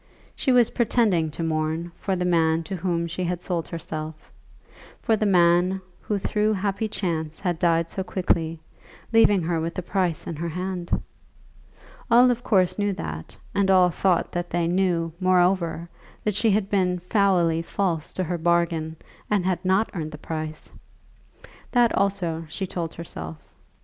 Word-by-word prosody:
She 265 - +1
was 245 -2 +5
pretending 215 -9 +2
to 155 +3 -5
mourn 160 +1 -1
for 195 - -2
the 180 0 -1
man 165 -2 +2
to 190 +4 -5
whom 170 -1 -1
she 170 +2 -4
had 180 0 -2
sold 170 -3 -2
herself; 155 -2 -7 0.7
for 225 - +2
the 215 0 0
man 180 0 +4 0.2
who 210 - -2
through 210 +2 +1
happy 200 +2 -1
chance 160 -6 -3
had 175 -4 -2
died 170 -2 +2
so 190 - -4
quickly, 165 -4 -1 0.5
leaving 205 -5 +5
her 165 0 0
with 165 +1 -3
the 185 - -3
price 180 -3 -1
in 170 - -4
her 170 +2 -3
hand! 180 +1 -3 1.1
All 245 +2 +6
of 240 -1 -2
course 190 -5 +2
knew 205 -1 +1
that, 80 - -7 0.2
and 200 -1 +2
all 185 -2 +5
thought 180 0 +1
that 175 0 -3
they 170 -1 0
knew, 175 -2 +1
moreover, 180 -2 +2 0.4
that 210 - 0
she 220 +3 +2
had 205 -1 +2
been 185 -3 +1
foully 180 -3 +2
false 165 -2 -2
to 185 - 0
her 175 0 -3
bargain, 165 -1 +1 0.3
and 205 -4 +1
had 185 -1 0
not 190 +4 +2
earned 155 -5 -4
the - - -6
price! 155 0 -5 1.1
That, 240 -2 +4
also, 175 -5 0
she 190 - -3
told 170 -3 -4
herself. 80 - -7
175 Hz, 165 wpm, -24 LUFS, 165-195 Hz, 1.1 s, All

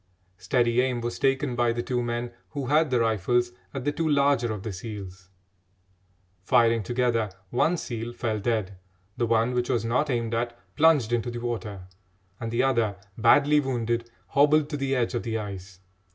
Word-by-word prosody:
Steady 120 +5 +2
aim 125 -2 0
was 120 0 -4
taken 135 -1 +1
by 120 -1 +2
the 120 +1 -2
two 125 -1 -1
men 120 0 -3 0.2
who 140 -3 -4
had 150 +3 +3
the 125 -2 +2
rifles 115 +2 +1 0.2
at 135 -2 -5
the 145 - +2
two 160 +2 -1
larger 140 -5 +3
of 105 -3 -5
the 110 - -4
seals. 95 -2 -8 1.1
Firing 115 +4 +3
together, 115 0 0 0.2
one 160 +8 +2
seal 120 -5 -5
fell 115 -2 -2
dead; 100 -3 -2 0.4
the 120 - 0
one 115 +2 +2
which 125 0 -1
was 120 -3 0
not 125 +6 +1
aimed 115 -3 -1
at 120 +1 -2 0.2
plunged 150 -7 +4
into 120 +1 0
the 120 - -5
water, 115 -5 -4 0.6
and 115 - -4
the 120 +3 +1
other, 115 -6 +1 0.2
badly 145 +6 +5
wounded, 120 -3 -1 0.2
hobbled 150 +1 +4
to - - -1
the 135 -1 0
edge 120 -3 0
of 120 - -1
the 115 -1 -2
ice. 95 -3 -7
120 Hz, 180 wpm, -26 LUFS, 115-130 Hz, 1.1 s, badly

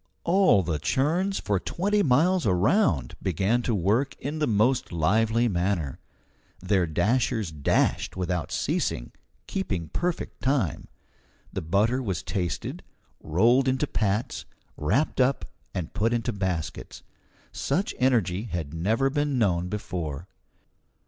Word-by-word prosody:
All 175 - +4
the 80 -3 -2
churns 170 - +1
for 100 -2 0
twenty 205 - 0
miles 165 - +3
around 90 - +2
began 95 +7 +1
to 120 -2 0
work 105 +9 +1
in 145 +4 -4
the 150 - +1
most 115 +4 +2
lively 110 +8 +2
manner. 90 - -1 0.6
Their 95 -1 +1
dashers 110 - +1
dashed 75 +4 0
without 90 -4 -2
ceasing, - - -1 0.3
keeping 90 - -3
perfect 175 - -3
time. 130 - 0 0.7
The - - -2
butter 105 +10 +1
was 95 -8 -3
tasted, 90 -4 -3 0.4
rolled 120 - +3
into 130 +3 +1
pats, 105 -4 -1 0.3
wrapped 110 - +1
up, 130 +2 +2 0.3
and 85 -4 -5
put 115 +2 +1
into 120 0 -1
baskets. 90 -5 -4 0.5
Such 195 - -1
energy 115 -6 +2
had 85 -8 -4
never 110 +11 +1
been 145 -1 0
known 90 -6 +1
before. 90 -6 -4
105 Hz, 120 wpm, -26 LUFS, 90-130 Hz, 0.7 s, All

